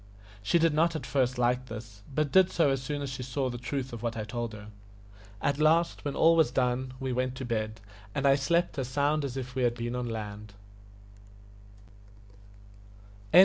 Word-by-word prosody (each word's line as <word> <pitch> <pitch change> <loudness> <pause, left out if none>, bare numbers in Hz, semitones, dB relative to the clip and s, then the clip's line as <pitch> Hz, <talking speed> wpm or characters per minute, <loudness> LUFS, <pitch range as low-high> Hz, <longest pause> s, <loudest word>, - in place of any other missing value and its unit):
She 100 +12 +2
did 165 -2 +3
not 165 +2 +2
at 155 - -4
first 130 -2 +1
like 125 +1 +1
this, 110 -3 -9
but 150 -2 +1
did 190 -1 +6
so 160 -5 +2
as 135 -1 0
soon 145 +2 -3
as 140 - -3
she 135 -1 -5
saw 130 +1 -2
the 120 - -6
truth 130 +1 -4
of 115 - -6
what 115 -1 -2
I 110 - -2
told 120 +1 -4
her. 105 0 -10 0.7
At 140 +1 +1
last, 165 +2 +3
when 145 - -3
all 165 +1 +5
was 160 -5 +4
done, 125 0 0
we 130 -2 -2
went 130 +1 -1
to 130 0 -5
bed, 110 -2 -2 0.4
and 140 - 0
slept 170 +1 +1
as 130 - -2
sound 145 +3 +1
as 135 -2 -4
if 125 -1 -5
we 130 - -2
had 120 -1 +2
been 120 0 -3
on 125 -1 -2
land. 105 -2 -6
130 Hz, 190 wpm, -29 LUFS, 120-145 Hz, 0.7 s, did